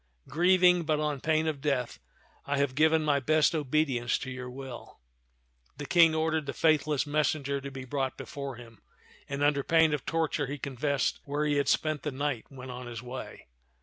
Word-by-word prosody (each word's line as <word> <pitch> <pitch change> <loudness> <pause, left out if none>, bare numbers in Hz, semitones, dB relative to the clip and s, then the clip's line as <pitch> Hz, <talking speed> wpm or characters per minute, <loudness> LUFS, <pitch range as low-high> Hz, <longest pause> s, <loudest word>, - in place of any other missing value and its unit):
Grieving, 180 +3 +4
but 155 -2 0
on 150 -3 -2
pain 160 0 +1
of 155 -3 -2
death, 135 -5 -1 0.5
I 145 0 0
have 140 -2 +1
given 160 +2 +3
my 145 -2 +3
best 155 +3 +3
obedience 140 -5 0
to 130 - -6
your 125 -1 -6
will." 130 -1 -9 0.8
The 145 - -6
King 165 +1 +5
ordered 160 -1 0
the 140 - -3
faithless 155 -3 +2
messenger 145 -2 0
to 140 - -6
be 130 -1 -8
brought 135 0 -2
before 140 -2 -6
him, 115 -2 -14 0.5
and 140 +1 -2
under 145 -1 +3
pain 160 +1 +3
of 150 - -2
torture 160 -3 0
he 145 +2 -4
confessed 140 0 -1
where 145 +1 -1
he 145 -1 +1
had 140 -1 +1
spent 155 -2 +1
the 150 - -2
night 135 -3 -3
when 130 -1 -9
on 125 0 -7
his 120 -1 -7
way. 125 +1 -8
145 Hz, 185 wpm, -29 LUFS, 130-155 Hz, 0.8 s, King